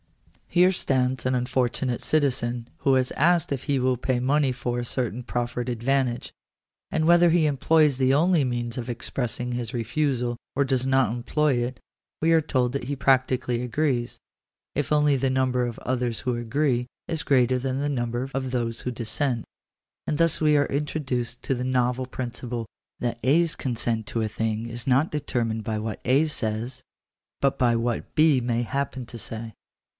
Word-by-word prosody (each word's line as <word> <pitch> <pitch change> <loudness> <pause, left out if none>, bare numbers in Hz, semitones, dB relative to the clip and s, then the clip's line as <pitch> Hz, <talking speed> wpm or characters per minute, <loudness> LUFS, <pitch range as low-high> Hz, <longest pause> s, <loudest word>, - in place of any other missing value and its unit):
Here 180 +1 +4
stands 130 -5 0
an 130 - +2
unfortunate 125 0 0
citizen 125 -5 0
who 135 -1 +3
is 130 -1 +1
asked 170 -1 +2
if 135 - -5
he 140 - +1
will 130 0 +2
pay 125 +1 0
money 135 +2 +2
for 120 -1 -2
a - - -2
certain 125 -1 -2
proffered 120 0 -2
advantage; 125 +1 0 0.6
and 160 0 0
whether 175 +1 +6
he 165 -1 +3
employs 150 0 +3
the 130 0 +3
only 165 +1 +4
means 120 -2 -2
of 125 0 -4
expressing 125 0 -3
his 120 0 -3
refusal 120 +1 0 0.2
or 140 +1 +2
does 130 -1 0
not 135 -4 +3
employ 145 +5 +1
it, 125 +2 -5 0.4
we 165 +1 +3
are 165 - +5
told 130 -5 0
that 140 -3 -3
he 140 +3 -2
practically 130 -2 +2
agrees; 125 -1 -1 0.6
if 145 +1 -1
only 150 -1 +4
the 135 0 +1
number 130 -1 +1
of 120 - -6
others 125 -2 -1
who 125 -1 -1
agree 125 +1 0 0.2
is 165 -2 -2
greater 130 -2 +3
than 130 +1 -2
the 145 - 0
number 120 -1 -2
of 130 -1 -2
those 115 -2 -2
who 125 - -3
dissent. 120 +1 -1 0.6
And 150 - 0
thus 165 -1 +2
we 150 -1 +4
are 145 - +3
introduced 135 -5 -2
to - - 0
the 125 -1 -2
novel 125 0 0
principle 120 -2 -4 0.3
that 120 -1 -2
A's 160 +5 +3
consent 115 -3 -2
to 115 - -2
a 110 - 0
thing 110 +1 -2
is 115 +1 -6
not 135 +5 +3
deter 135 -5 -1
mined 110 -1 -3
by 110 0 -2
what 110 0 -4
A 135 +6 +3
says, 120 -2 -3 0.6
but 140 -1 +1
by 120 -3 +3
what 115 0 -2
B 155 -4 +5
may 120 0 0
happen 130 0 -3
to 115 - -8
say 110 0 -6
125 Hz, 180 wpm, -25 LUFS, 120-140 Hz, 0.6 s, whether